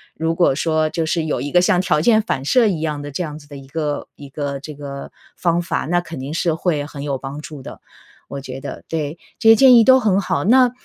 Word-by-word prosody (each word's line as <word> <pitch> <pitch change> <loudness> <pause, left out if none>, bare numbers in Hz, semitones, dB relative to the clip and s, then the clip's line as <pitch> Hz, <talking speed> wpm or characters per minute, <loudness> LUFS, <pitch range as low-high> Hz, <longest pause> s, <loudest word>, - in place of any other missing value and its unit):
如 165 +1 -1
果 170 -5 +3
说 155 +1 0
就 165 +1 -2
是 160 0 -1
有 155 - -1
一 145 - -4
个 175 - +5
像 180 0 +3
条 180 - +1
件 220 +5 +4
反 210 - -3
射 235 - +4
一 175 -6 -1
样 150 -2 -2
的 145 0 -7
这 180 - -3
样 150 -2 -6
子 145 - -17
的 145 - -11
一 135 -1 -12
个 150 0 -3
一 140 -1 -12
个 140 -1 -4
这 150 +2 -9
个 140 -1 -8 0.3
方 170 -1 +1
法， 170 - -2
那 175 +3 +1
肯 165 -4 -8
定 135 +3 -6
是 165 0 0
会 160 -3 -1
很 145 -2 -8
有 140 -2 -2
帮 135 +2 -7
助 155 -3 -9
的， - - -11 0.5
我 140 - -6
觉 130 0 -7
得， 140 - -7
对， 155 -1 -3 0.2
这 225 - +4
些 225 - +9
建 260 +1 +7
议 230 - +7
都 260 +2 +6
很 205 -5 +2
好。 - - -1
那 250 +3 +5
155 Hz, 275 characters per minute, -20 LUFS, 145-180 Hz, 0.5 s, 些